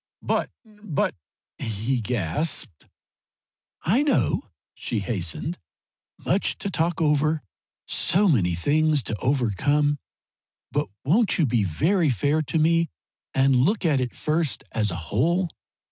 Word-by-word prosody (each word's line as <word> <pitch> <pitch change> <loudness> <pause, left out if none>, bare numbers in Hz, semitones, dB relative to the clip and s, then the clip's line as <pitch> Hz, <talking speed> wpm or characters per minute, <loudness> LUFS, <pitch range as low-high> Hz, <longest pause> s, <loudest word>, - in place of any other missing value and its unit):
"But - - 0 0.2
but 210 -8 -2 0.3
" - - -69
he 115 +4 -1
gasped. 110 - -2 1.0
"I 220 - +3
know," 295 -1 +1 0.2
she 115 -4 -3
hastened 100 - -3 0.7
"much 190 +3 +1
to 200 - -4
talk 170 -1 0
over; 155 0 +2 0.4
so 195 +5 +2
many 95 - +3
things 150 - +2
to 110 - -3
overcome. 145 +4 +1 0.7
But - - 0 0.2
won't 200 - +3
you 165 - +3
be 120 -4 +1
very 160 - +2
fair 145 - +1
to 160 +2 -2
me 165 +1 +3 0.5
and 135 -1 +4
look 185 - +2
at 145 -5 +3
it 125 -2 -3
first 155 -2 0
as 105 -1 0
a 85 - -2 0.2
whole? 170 - +2
145 Hz, 130 wpm, -25 LUFS, 120-165 Hz, 1.0 s, and